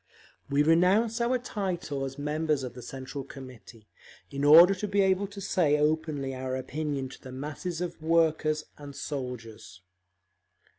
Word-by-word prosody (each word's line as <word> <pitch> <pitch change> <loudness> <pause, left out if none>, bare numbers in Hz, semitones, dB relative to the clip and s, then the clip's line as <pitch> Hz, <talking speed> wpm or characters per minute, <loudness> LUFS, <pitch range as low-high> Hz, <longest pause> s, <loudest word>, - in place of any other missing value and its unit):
We 145 +1 +3
renounce 190 +9 +3
our 245 +2 +2
title 180 - -3
as 135 +1 -7
members 150 0 -1
of 125 - -5
the 125 - -10
Central 135 +3 -7
Committee, 125 -5 -12 0.4
in 140 0 -3
order 165 +6 +9
to 195 +2 -4
be 200 0 +2
able 190 +1 +2
to 200 0 -10
say 175 -6 +2
openly 150 -2 0
our 130 0 -3
opinion 140 +1 -3
to - - -13
the 130 - -10
masses 150 +6 -5
of 175 -2 -5
workers 155 -1 +2 0.2
and 145 -1 -9
soldiers…. 120 -10 -7
150 Hz, 150 wpm, -28 LUFS, 135-175 Hz, 0.4 s, order